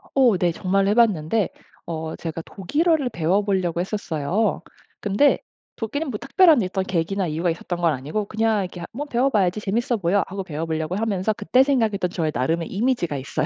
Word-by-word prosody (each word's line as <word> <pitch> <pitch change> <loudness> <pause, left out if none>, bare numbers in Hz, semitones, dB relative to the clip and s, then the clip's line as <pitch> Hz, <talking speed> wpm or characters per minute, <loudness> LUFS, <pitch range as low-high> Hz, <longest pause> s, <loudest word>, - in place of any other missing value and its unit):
어 250 -7 +5
네. 175 -1 +2
정말 195 +3 +1
해봤는데 210 -3 +2 0.4
어 160 -1 -4
제가 165 -1 -5
독일어를 290 - 0
배워 175 +1 +1
보려고 185 -4 0
했었어요. 190 +1 -1 0.4
근데 205 +8 +3 0.4
독일은 280 +7 -3
뭐 220 - -3
특별한 310 -1 +5
어떤 190 +1 -1
계기나 190 +1 -1
이유가 165 +3 -1
있었던 175 +1 -3
건 165 -2 +3
아니고 150 +11 -3
그냥 220 0 +1
이렇게 180 -1 -7
한 170 - -6
뭐 285 +5 -5
'배워 265 -1 +1
봐야지. 200 -5 +1
재밌어 235 +5 0
보여.' 195 +1 +2
하고 195 0 -5
배워 160 -3 -4
보려고 160 +1 -2
하면서 210 -1 0
그때 250 +5 +3
생각했던 225 -9 +1
저의 165 -3 -1
나름의 160 +7 0
이미지가 205 - 0
있어요. 140 +3 -2
195 Hz, 415 characters per minute, -23 LUFS, 170-225 Hz, 0.4 s, 어